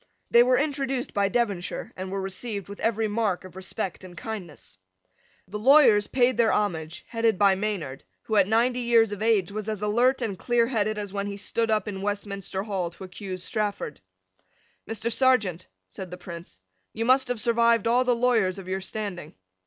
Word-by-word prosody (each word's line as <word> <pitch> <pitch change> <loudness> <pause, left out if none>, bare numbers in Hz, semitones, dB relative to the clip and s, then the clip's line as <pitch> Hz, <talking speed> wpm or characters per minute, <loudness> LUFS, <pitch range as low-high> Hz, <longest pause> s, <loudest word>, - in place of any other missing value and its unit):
They 235 - +7
were 250 +1 +4
introduced 275 -3 -1
by 200 -1 +2
Devonshire, 205 -6 -2
and 185 0 -6
were 195 0 -2
received 200 +1 -5
with 200 - -9
every 225 -1 0
mark 210 -3 -1
of 185 - -12
respect 190 -1 -4
and 180 -2 -12
kindness. 180 - -8 0.7
The 210 +3 -5
lawyers 230 -4 +6
paid 255 0 +2
their 230 -2 +4
homage, 165 -6 -2
headed 230 -3 +1
by 200 0 +5
Maynard, 190 -9 -3 0.2
who, 220 - -2
at 200 -3 +5
ninety 240 +3 +2
years 230 -3 +3
of 205 0 -5
age, 215 -4 +2
was 215 +1 -4
as 210 -1 -3
alert 245 +5 +2
and 200 -5 -3
clearheaded 230 -3 +1
as 205 -2 -5
when 200 0 -2
he 200 0 -5
stood 225 +3 -1
up 215 0 +1
in 195 -2 -5
Westminster 200 -1 -3
Hall 195 -5 -2
to 170 - -12
accuse 185 -1 -6
Strafford. 205 -8 -3 0.9
"Mr. 225 +1 -2
Serjeant," 220 -9 +2 0.2
said 180 - -8
the 180 - -8
Prince, 170 - -10 0.3
"you 225 - -2
must 260 +2 +4
have 245 -2 -2
survived 235 -1 +3
all 245 +2 +4
the 250 -1 +2
lawyers 230 -6 +2
of 190 -2 -9
your 190 +1 -2
standing." 190 -5 -5
210 Hz, 185 wpm, -26 LUFS, 190-235 Hz, 0.9 s, They